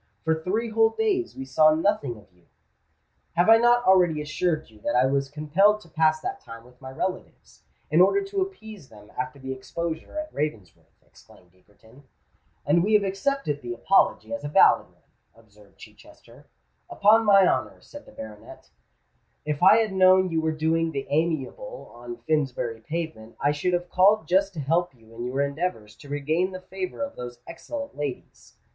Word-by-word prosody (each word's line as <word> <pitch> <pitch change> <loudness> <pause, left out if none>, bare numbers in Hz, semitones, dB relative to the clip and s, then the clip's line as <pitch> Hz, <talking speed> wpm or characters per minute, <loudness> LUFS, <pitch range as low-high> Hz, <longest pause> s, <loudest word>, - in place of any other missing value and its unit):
"For 160 - +2
three 220 +6 -2
whole 225 0 +4
days 385 - -1
we 135 - -7
saw 155 +3 +4
nothing 160 - -1
of 105 - -17
you——" 90 -1 -29 0.9
"Have 175 +5 +3
I 225 - +9
not 240 +1 +3
already 180 -6 +4
assured 155 +2 -2
you 105 - -19
that - - -2
I 125 +1 +4
was 135 0 0
compelled 165 +9 +2
to 170 - -17
pass 155 0 +1
that - - -4
time 115 0 -11
with 125 +1 -21
my 130 - -8
relatives, 185 +8 -6 0.3
in 160 +3 +5
order 395 - +4
to 390 0 -3
appease 220 - -7
them 105 -1 -16
after 130 +2 -4
the 130 -1 -6
exposure 165 - -6
at 310 0 -5
Ravensworth?" 115 - -6
exclaimed 90 -1 -21
Egerton. 110 +8 -22 0.6
"And 170 - +3
we 215 +2 +2
have 210 - +4
accepted 195 - -2
the 120 -1 -5
apology 195 - +1
as 285 - -5
a - - -3
valid 145 - +4
one," - - -31 0.3
observed 105 -3 -22
Chichester. - - -17 0.4
"Upon 215 +3 +4
my 200 -3 +6
honour," - - -1
said 290 0 -13
the - - -14
baronet, 110 - -12 0.7
"if 150 0 -3
I 190 +4 +7
had 220 -3 0
known 185 -1 +4
you 160 -1 0
were 160 0 0
doing 160 +1 0
the 135 -1 -3
amiable 170 - -3
on 120 0 -9
Finsbury 135 -7 -1
Pavement, 155 -7 -6
I 145 - +2
should 150 +5 -1
have 175 0 -2
called 190 -1 +4
just 195 +3 +2
to 155 - -4
help 165 +2 0
you 115 -1 -20
in 120 +1 -6
your 130 +3 -2
endeavours 140 -8 -4
to 145 - -14
regain 155 +6 -1
the 185 - -7
favour 190 +7 -5
of 280 - -6
those 120 -1 -8
excellent 280 - -7
ladies." 145 -3 -7
160 Hz, 180 wpm, -25 LUFS, 130-195 Hz, 0.9 s, I